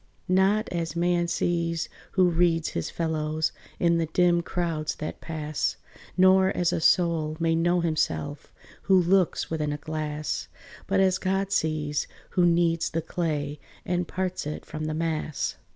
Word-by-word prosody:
Not 190 +4 +3
as 170 -2 -3
man 175 0 +1
sees 170 -1 0 0.3
who 185 -2 +4
reads 165 -1 +2
his 85 - -3
fellows 155 -1 -1 0.3
In 170 -1 +3
the 165 - 0
dim 175 +1 +3
crowds 165 -3 -2
that 155 - -6
pass: 155 -2 -2 0.4
Nor 190 0 +6
as 175 0 +2
a - - -1
soul 160 -3 +2
may 165 -1 +2
know 175 +2 +2
himself, 155 -3 -2 0.4
Who 190 -1 +7
looks 180 -1 +2
within 155 -2 -1
a 145 - -2
glass: 155 0 -3 0.4
But 195 0 +2
as 190 -1 +3
God 195 +1 -1
sees, 155 -5 0 0.2
who 180 -2 +3
kneads 170 -1 +2
the 165 0 -2
clay, 150 -4 -2 0.3
And 180 -1 -1
parts 185 -4 -3
it 150 - -5
from 155 0 -5
the 155 0 -2
mass. 155 -3 -2
165 Hz, 150 wpm, -26 LUFS, 155-180 Hz, 0.4 s, Who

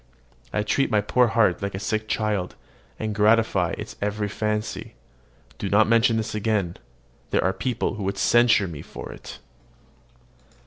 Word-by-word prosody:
I 105 - 0
treat 135 +6 +1
my 105 -3 +3
poor 120 +4 +3
heart 110 -5 +2
like 100 -1 -3
a - - -4
sick 110 +1 -2
child, 105 -4 -1 0.4
and 110 -1 -3
gratify 105 -4 +3
its - - -8
every 105 0 -1
fancy. 105 +1 -3 0.6
Do 100 - -3
not 105 +3 +4
mention 115 0 +4
this 110 - -3
again: 105 -5 -1 0.5
there - - +1
are 95 +2 +1
people 120 +2 -2
who 105 - -5
would 100 0 -2
censure 115 -2 +4
me 80 -4 -7
for - - -9
it. - - -10
105 Hz, 160 wpm, -24 LUFS, 100-110 Hz, 0.6 s, not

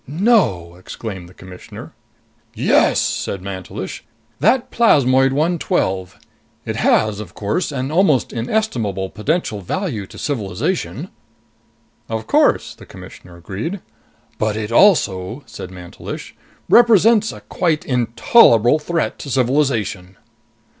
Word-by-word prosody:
"No!" 145 - +1
exclaimed 95 -1 -8
the - - -17
Commissioner. 90 -1 -11 0.6
"Yes," - - +3
said 95 -2 -2
Mantelish. 95 -2 -7 0.4
"That 255 0 +2
plasmoid 135 - +4
112 145 - -1 0.5
it - - -4
has, 110 -1 +2
of 100 -5 -9
course, 105 - -2
an 135 0 -3
almost 160 - +2
inestimable 115 - -2
potential 110 - -2
value 115 - -3
to - - -13
civilization." 105 -11 -3 1.0
"Of 110 -1 -3
course," - - +2
the - - -16
Commissioner 90 -1 -13
agreed. 100 - -5 0.6
"But 110 0 0
it 110 0 -4
also," 115 - +3
said 115 -5 -9
Mantelish, 90 -1 -9 0.3
"represents 225 -1 +5
a - - -11
quite 165 -4 -1
intolerable 120 - +4
threat 165 +2 -2
to 140 - -7
civilization." 120 -8 0
120 Hz, 110 wpm, -19 LUFS, 95-160 Hz, 1.0 s, represents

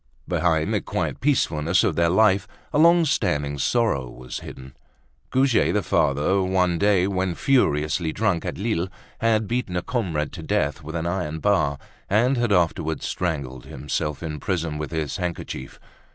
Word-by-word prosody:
Behind 80 -3 +1
the - - +1
quiet - - -3
peacefulness 90 - +2
of - - +1
their 85 0 +3
life, 100 +1 +3 0.3
a 145 - +3
long 170 +1 +6
standing 75 - 0
sorrow 85 - +1
was 65 0 -7
hidden. 65 0 -11 0.5
Goujet 130 -2 +3
the - - +1
father, 75 +8 +2
one 90 -2 +1
day 100 -3 +3
when 95 -2 -1
furiously 80 - +1
drunk 100 -3 0
at - - -4
Lille, 100 -4 -1 0.3
had 110 -2 +2
beaten 120 -6 -2
a 90 - -2
comrade 85 - -2
to - - -7
death 75 +2 -1
with 80 +2 -7
an 80 0 -2
iron 85 -3 -2
bar 80 -6 +1 0.3
and 120 +7 +3
had 120 -3 0
afterwards 80 -4 +1
strangled 70 -8 -3
himself 75 +1 -3
in 75 -2 -4
prison 80 -3 -2
with 75 - -4
his 80 -4 -3
handkerchief. 85 -7 -5
85 Hz, 160 wpm, -24 LUFS, 75-105 Hz, 0.5 s, long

